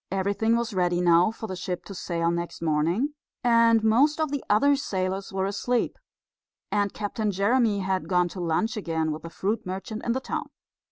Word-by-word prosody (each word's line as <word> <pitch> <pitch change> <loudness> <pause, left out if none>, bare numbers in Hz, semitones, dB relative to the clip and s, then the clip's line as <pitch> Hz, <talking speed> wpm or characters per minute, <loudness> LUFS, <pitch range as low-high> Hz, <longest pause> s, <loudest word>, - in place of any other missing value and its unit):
Everything 200 +4 +1
was 235 -1 -2
ready 175 -2 +1
now 175 +1 +5
for 225 0 -7
the 190 -3 -5
ship 180 0 -4
to 200 - -8
sail 170 -2 -1
next 170 0 -4
morning, 170 - 0 0.3
and 230 -2 +5
most 270 +8 +4
of 310 -2 0
the 285 -2 -2
other 280 +8 +4
sailors 195 -6 -2
were 190 0 -1
asleep, 220 +5 -1 0.8
and 205 -1 +1
Captain 210 +1 -2
Jeremy 205 +2 +2
had 190 0 -2
gone 180 -1 +3
to 185 - -8
lunch 175 +8 0
again 160 -6 -1
with 155 +1 -5
the 165 - -8
fruit 210 +6 -2
merchant 195 +4 -5
in 235 - 0
the 260 - -1
town. - - -4
200 Hz, 185 wpm, -26 LUFS, 180-230 Hz, 0.8 s, now